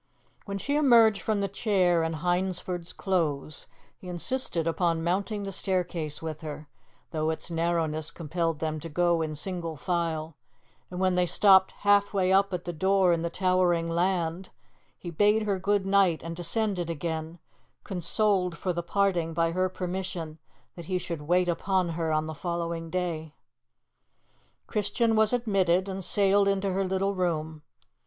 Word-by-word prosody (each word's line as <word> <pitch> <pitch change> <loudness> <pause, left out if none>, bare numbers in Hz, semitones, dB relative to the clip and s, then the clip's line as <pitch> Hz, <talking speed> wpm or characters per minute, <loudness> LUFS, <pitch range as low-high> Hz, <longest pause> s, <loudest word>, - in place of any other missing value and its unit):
When 200 -1 -4
she 285 +8 -1
emerged 230 -8 +5
from 215 -2 0
the 200 - 0
chair 185 -4 +1
in 160 0 -1
Hyndford's 175 +1 -1
Close 155 -6 -2 0.3
he 185 - -11
insisted 180 -1 -1
upon 165 0 0
mounting 200 +4 -1
the 195 - -4
staircase 175 -5 -2
with 155 -1 -5
her, 150 -1 -7 0.4
though 155 -1 -1
its 160 +2 -4
narrowness 165 -2 0
compelled 165 0 -2
them 155 0 -3
to 165 - -7
go 170 +1 +1
in 155 -1 -3
single 170 -1 -3
file; 165 -1 -2 0.6
and 180 - -6
when 185 -1 +2
they 180 0 +2
stopped 190 +1 +5
halfway 200 -2 +3
up 195 +1 +3
at 180 -1 -4
the 175 - -4
door 190 +2 +3
in 165 - -1
the 170 - -2
towering 180 -2 +1
'land,' 175 +1 -1 0.5
he 175 - -7
bade 210 +6 +3
her 200 -3 -1
good 200 +1 +1
night 195 -4 +3
and 165 0 -5
descended 180 0 -1
again, 160 +1 -4 0.5
consoled 185 0 +1
for 185 -2 -2
the 175 - -2
parting 175 -3 0
by 165 0 +1
her 185 +2 0
permission 180 -3 -5 0.4
that 170 - -9
he 185 +2 -1
should 170 -3 -5
wait 180 +1 +3
upon 180 +1 0
her 165 -1 -2
on 155 0 +1
the 160 - -5
following 170 0 -4
day. 160 -3 -3 1.3
Christian 220 +2 0
was 215 0 +4
admitted 195 -6 +1
and 190 0 -4
sailed 200 +1 +3
into 195 0 0
her 195 +1 0
little 190 +1 0
room. 160 -4 -2
180 Hz, 160 wpm, -27 LUFS, 165-195 Hz, 1.3 s, emerged